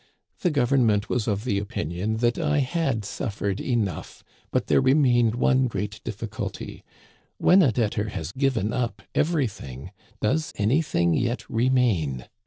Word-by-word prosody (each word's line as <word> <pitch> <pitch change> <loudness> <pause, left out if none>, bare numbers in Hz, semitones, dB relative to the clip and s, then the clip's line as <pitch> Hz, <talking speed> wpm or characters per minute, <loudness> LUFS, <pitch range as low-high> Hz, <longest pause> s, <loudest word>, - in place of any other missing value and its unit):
The 180 - +1
Government 120 -7 +2
was 120 -4 -1
of 105 -1 -1
the 100 -6 0
opinion 100 +2 -3
that 120 +5 +1
I 150 -2 +1
had 135 - 0
suffered 100 -1 -3
enough, 110 - -2 0.3
but - - 0
there - - +3
remained 125 -4 +3
one 130 +1 +3
great 105 -2 -4
difficulty 110 -1 -6 0.3
— - - -35
when 190 +2 +5
a 140 -9 +4
debtor 110 -2 -1
has 80 -4 -5
given 130 -4 0
up 115 -6 -2
everything, 105 - -2 0.3
does 150 +8 0
anything 105 - +1
yet 120 +8 -1
re 120 +3 +1
main 85 - +1
115 Hz, 145 wpm, -25 LUFS, 100-130 Hz, 0.3 s, when